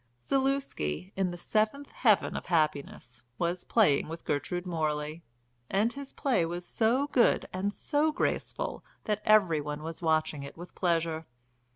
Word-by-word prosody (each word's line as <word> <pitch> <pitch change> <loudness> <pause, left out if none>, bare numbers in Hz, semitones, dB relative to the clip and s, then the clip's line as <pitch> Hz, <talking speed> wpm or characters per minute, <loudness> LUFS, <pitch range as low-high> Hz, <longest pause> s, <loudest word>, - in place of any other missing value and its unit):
Zaluski, 265 - -1
in 190 -1 +1
the 175 - -6
seventh 220 +9 0
heaven 215 -6 +3
of - - -5
happiness, 150 -7 -1 0.2
was 175 +1 -1
playing 155 -12 +3
with 165 +1 -7
Gertrude 175 +5 -2
Morley, 155 -2 -2 0.5
and 215 +5 +2
his 280 -1 -8
play 260 -10 +1
was 175 +2 -4
so 240 +8 +2
good 245 -5 +3
and 190 +2 -1
so 300 +7 +1
graceful 320 - -2 0.2
that 210 -1 -1
every 190 -8 +5
one 150 +1 -5
was 165 +2 -6
watching 155 -3 +1
it 140 +2 -9
with 175 +2 -10
pleasure. 165 -3 0
175 Hz, 150 wpm, -30 LUFS, 155-220 Hz, 0.5 s, every